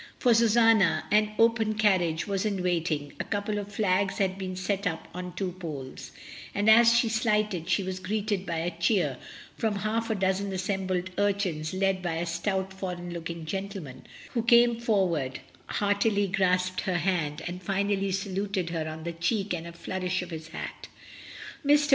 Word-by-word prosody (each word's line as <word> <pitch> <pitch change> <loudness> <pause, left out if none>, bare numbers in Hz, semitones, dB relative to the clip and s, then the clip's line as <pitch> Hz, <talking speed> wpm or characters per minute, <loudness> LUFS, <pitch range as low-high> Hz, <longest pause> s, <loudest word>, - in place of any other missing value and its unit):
For 245 -3 +4
Susanna 225 -4 +4
an 210 0 +4
open 225 -1 +3
carriage 185 -7 +2
was 195 -2 -1
in 200 -4 -1
wait 175 -2 +1
ing, 145 -2 -3
a - - 0
couple 205 +1 -2
of 205 0 -7
flags 195 -2 +1
had 190 -2 +1
been 190 -1 -5
set 195 +2 -1
up 165 -2 -4
on 180 0 -6
two 185 -1 -2
poles, 145 -7 -7 0.5
and 205 +1 +1
as 230 +1 +7
she 240 - +3 0.2
alighted 210 -7 +1
she 200 - +2
was 185 0 -4
greeted 205 0 -1
by 170 -3 -3
a 170 +2 -1
cheer 170 - +1 0.4
from 220 -2 0
half 220 +3 -1
a 220 - +1
dozen 190 +1 0
assembled 185 -1 -2
urchins 195 -6 0
led 190 0 +1
by 175 -2 -2
a 170 +1 -1
stout 190 +3 -2
foreign 180 -2 -5
looking 170 -1 -5
gentleman, 190 -7 -6 0.2
who 235 - 0
came 235 0 +5
forward, 180 - 0 0.3
heart 205 -1 +1
ily 205 -2 +2
grasped 185 -1 +1
her 185 -2 0
hand, 165 -4 -1
and 175 +1 -5
finally 195 +1 0
saluted 195 -1 -2
her 160 -2 -2
on 160 0 -7
the 170 +1 -4
cheek 195 +5 -1
with 170 -1 -4
a - - -7
flourish 185 +2 -3
of 175 - -10
his 160 -1 -6
hat. 165 - -7 0.8
Mr. 290 0 +4
190 Hz, 180 wpm, -28 LUFS, 175-205 Hz, 0.8 s, as